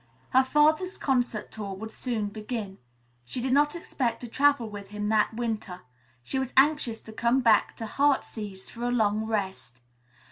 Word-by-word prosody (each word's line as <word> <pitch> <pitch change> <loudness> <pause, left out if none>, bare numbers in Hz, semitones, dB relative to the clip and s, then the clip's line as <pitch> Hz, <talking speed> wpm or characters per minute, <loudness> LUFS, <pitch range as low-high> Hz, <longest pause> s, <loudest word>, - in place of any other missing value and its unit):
Her 260 +1 +6
father's 305 +7 +2
concert 245 -5 0
tour 200 -3 -5
would 220 +3 -7
soon 220 -5 -3
begin. 210 -2 -5 0.4
She 120 - -4
did 255 +1 0
not 295 +3 +3
expect 260 -7 -2
to 245 - -6
travel 280 -1 +3
with 205 -2 -8
him 210 +1 -3
that 220 0 +2
winter. 220 -6 -3 0.4
She 265 - -2
was 265 -1 -3
anxious 270 -5 +3
to 220 - -11
come 235 +4 +2
back 225 -4 +3
to 225 - -5
"Heartsease" 220 -7 -1
for 230 - -10
a - - +1
long 220 -2 +1
rest. 190 - -3
225 Hz, 170 wpm, -27 LUFS, 210-265 Hz, 0.4 s, Her